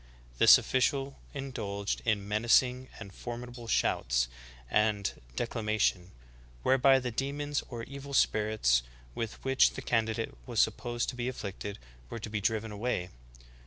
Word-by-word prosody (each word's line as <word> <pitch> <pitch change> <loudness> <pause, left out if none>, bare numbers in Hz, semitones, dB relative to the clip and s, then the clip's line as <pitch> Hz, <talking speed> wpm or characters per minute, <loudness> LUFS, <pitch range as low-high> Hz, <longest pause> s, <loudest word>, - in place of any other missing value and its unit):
This - - +10
official 135 +1 0
indulged 105 -8 -3
in 105 -3 +1
''menacing 125 +4 +3
and 100 -1 -9
formidable 120 0 -7
shouts - - +1 0.4
and 105 +4 +1 0.2
declama 110 - -2
tion'' 90 -3 +1 0.5
whereby 135 +1 +5
the 125 -2 -2
demons 145 +4 -2
or 120 -2 -5
evil 140 +2 -7
spirits 105 - +3 0.3
with 115 - -4
which 135 0 +4
the - - -6
candidate 115 - 0
was - - -1
supposed 120 0 +1
to - - -5
be 120 0 -3
afflicted 100 -4 -6 0.3
were - - -5
to 110 -1 -7
be 105 -1 -2
driven 110 +1 0
away. 105 -4 -2
115 Hz, 135 wpm, -30 LUFS, 105-130 Hz, 0.5 s, This